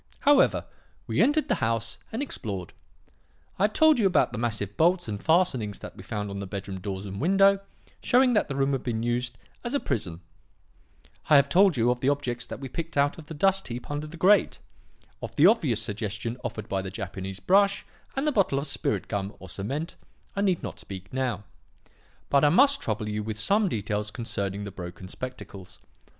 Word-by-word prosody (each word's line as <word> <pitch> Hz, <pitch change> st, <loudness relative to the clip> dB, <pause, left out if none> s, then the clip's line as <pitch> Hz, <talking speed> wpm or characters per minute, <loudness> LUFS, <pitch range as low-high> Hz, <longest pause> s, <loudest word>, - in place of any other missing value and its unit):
"However, 285 Hz, -1 st, +4 dB, 0.4 s
we -, -, +1 dB
entered 300 Hz, +2 st, +3 dB
the -, -, 0 dB
house 115 Hz, 0 st, -1 dB
and 230 Hz, +6 st, -2 dB
explored. 100 Hz, -, -5 dB, 0.9 s
I 195 Hz, -, +5 dB
have 215 Hz, -, -1 dB
told 315 Hz, -4 st, +5 dB
you 205 Hz, -, +4 dB
about 180 Hz, -, +2 dB
the 120 Hz, -, -5 dB
massive 110 Hz, -4 st, -2 dB
bolts 175 Hz, 0 st, +3 dB
and 105 Hz, -2 st, -5 dB
fastenings 130 Hz, -, +2 dB
that -, -, -9 dB
we -, -, -10 dB
found 105 Hz, 0 st, -4 dB
on 100 Hz, -, -5 dB
the 100 Hz, -, -5 dB
bedroom 95 Hz, -1 st, -5 dB
doors 95 Hz, 0 st, -5 dB
and 100 Hz, +2 st, -6 dB
window, 195 Hz, +4 st, +5 dB, 0.4 s
showing 250 Hz, 0 st, +4 dB
that 210 Hz, -, +2 dB
the 135 Hz, -, -4 dB
room 135 Hz, 0 st, +1 dB
had 135 Hz, -2 st, -1 dB
been 115 Hz, -2 st, -2 dB
used 120 Hz, +1 st, -1 dB, 0.3 s
as 240 Hz, +3 st, -2 dB
a -, -, +2 dB
prison. 90 Hz, -, -3 dB, 1.1 s
I 150 Hz, -, +7 dB
have 140 Hz, 0 st, +5 dB
told 190 Hz, -2 st, +5 dB
you 120 Hz, +1 st, +3 dB
of 125 Hz, -, -2 dB
the 130 Hz, -, +2 dB
objects 125 Hz, -4 st, -2 dB
that -, -, -7 dB
we 135 Hz, -, -6 dB
picked 165 Hz, +3 st, -5 dB
out 140 Hz, +3 st, +2 dB
of 155 Hz, -, -12 dB
the 160 Hz, -, -7 dB
dust 195 Hz, +5 st, +2 dB
heap 120 Hz, +3 st, -6 dB
under 145 Hz, +1 st, -3 dB
the 165 Hz, +2 st, -10 dB
grate. 195 Hz, +4 st, +4 dB, 0.6 s
Of -, -, -7 dB
the 150 Hz, -, +5 dB
obvious 160 Hz, -, +4 dB
suggestion 105 Hz, +2 st, -3 dB
offered 110 Hz, -3 st, -5 dB
by 95 Hz, -1 st, -1 dB
the 95 Hz, -, -5 dB
Japanese 95 Hz, -1 st, -6 dB
brush 200 Hz, -, +3 dB, 0.3 s
and 270 Hz, +2 st, -1 dB
the 300 Hz, -, +3 dB
bottle 195 Hz, -, +2 dB
of 140 Hz, -, -1 dB
'spirit 140 Hz, 0 st, -1 dB
gum' 100 Hz, -1 st, -3 dB
or 95 Hz, -, -11 dB
cement, 135 Hz, -, -4 dB, 0.4 s
I 200 Hz, -, 0 dB
need 190 Hz, -4 st, +1 dB
not -, -, -6 dB
speak 95 Hz, +1 st, -9 dB
now; 125 Hz, -6 st, -1 dB, 0.8 s
but 140 Hz, 0 st, +3 dB
I 145 Hz, -, +6 dB
must 275 Hz, -, +5 dB
trouble 105 Hz, -1 st, -2 dB
you 105 Hz, 0 st, -2 dB
with 110 Hz, 0 st, -4 dB
some 200 Hz, -, +3 dB
details 105 Hz, -, -2 dB
concerning 100 Hz, -3 st, -3 dB
the 100 Hz, -, -6 dB
broken 90 Hz, 0 st, -8 dB
spectacles. 100 Hz, -4 st, -8 dB
125 Hz, 200 wpm, -27 LUFS, -, 1.1 s, I